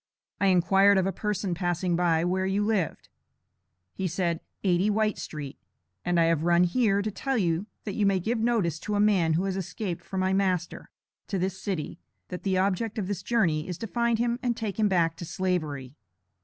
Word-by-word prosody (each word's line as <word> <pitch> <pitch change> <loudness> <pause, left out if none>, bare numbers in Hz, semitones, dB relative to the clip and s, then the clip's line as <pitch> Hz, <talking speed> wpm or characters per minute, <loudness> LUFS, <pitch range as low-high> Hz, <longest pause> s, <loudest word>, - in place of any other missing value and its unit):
I 200 - +3
inquired 195 +2 +5
of 190 - +2
a 195 - +1
person 205 -1 -2
passing 175 0 0
by, 170 -1 +2
where 185 +1 0
you 200 +2 +1
lived. 205 -7 -1 0.9
He 190 - -2
said, 170 -1 -1 0.2
80, 185 +1 +2
White 215 0 +1
Street, 145 -3 -7 0.4
and 175 -1 +1
I - - +5
have 165 -2 +2
run 175 +1 +4
here, 200 +1 +2
to 215 - -2
tell 270 +5 -2
you 175 -1 0 0.2
that 205 - -4
you 205 -1 +2
may 195 -1 +2
give 225 +6 -1
notice 220 -9 +1
to 210 - -3
a - - +1
man 195 -6 +3
who 170 +4 +1
has 195 -1 -1
escaped 190 -1 -4
from 190 -1 -3
my 190 0 +1
master, 185 -3 -1 0.4
to 195 - -2
this 190 +1 -2
city, 175 -3 -4 0.3
that 180 - -5
the 190 -2 0
object 200 +4 0
of 210 - -1
this 195 -1 -3
journey 175 -9 +1
is 180 -2 -4
to 225 - -5
find 235 +1 +1
him 240 +1 0
and 240 -2 -1
take 220 -1 -4
him 215 - +4
back 165 -3 +2
to 170 - -7
Slavery." 155 - -2
190 Hz, 205 wpm, -27 LUFS, 175-210 Hz, 0.9 s, inquired